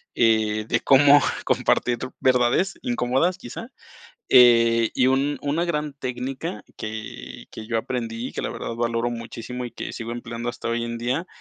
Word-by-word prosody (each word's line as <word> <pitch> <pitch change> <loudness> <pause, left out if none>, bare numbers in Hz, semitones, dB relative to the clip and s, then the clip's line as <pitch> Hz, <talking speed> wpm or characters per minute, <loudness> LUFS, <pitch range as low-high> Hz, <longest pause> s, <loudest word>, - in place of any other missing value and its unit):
eh, 110 -2 +2
de 115 - +1
cómo 145 +1 +6 0.2
compartir 120 0 +1 0.2
verdades 130 +9 +2
incómodas 130 +9 +1
quizá, 120 - -8 0.6
eh, 115 -2 +6
y 130 - +3
un 135 +2 +1
una 150 +4 0
gran 150 -3 -2
técnica 125 -4 -5
que 110 - -7
que 110 - -9
yo 115 0 0
aprendí, 115 0 -4
que - - -4
la - - -2
verdad 115 - -5
valoro 115 0 -1
muchísimo 120 +1 -6
y - - -8
que - - -6
sigo 115 0 -5
empleando 120 0 -5
hasta 120 -1 -6
hoy 115 0 -1
en 115 0 -4
día. 130 +9 -2
120 Hz, 160 wpm, -23 LUFS, 115-130 Hz, 0.6 s, cómo